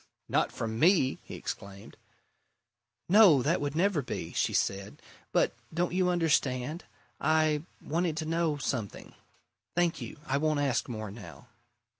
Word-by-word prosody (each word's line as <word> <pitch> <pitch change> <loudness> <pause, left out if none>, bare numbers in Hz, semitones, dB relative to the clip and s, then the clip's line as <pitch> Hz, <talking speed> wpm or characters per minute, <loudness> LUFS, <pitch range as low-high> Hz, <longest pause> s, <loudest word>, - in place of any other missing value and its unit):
"Not - - +1
from 110 0 -4
me!" 165 -5 +4
he - - -9
exclaimed. 100 0 -7 1.1
"No 185 - +7
that 165 +3 +1
would 145 0 -2
never 180 -2 +2
be!" 125 - -5
she - - +1
said. 100 +1 -1 0.3
"But - - +2 0.2
don't 170 +2 -1
you 180 0 +2
understand? 155 -3 0 0.3
I 155 0 +2 0.2
wanted 165 0 -1
to 160 - -2
know 165 -1 0
something. 120 -7 -4 0.6
Thank 175 -1 +1
you. - - -7
I 135 - 0
won't 155 -1 +1
ask 135 -4 0
more 110 -3 -5
now." 120 +2 -12
150 Hz, 140 wpm, -29 LUFS, 125-170 Hz, 1.1 s, No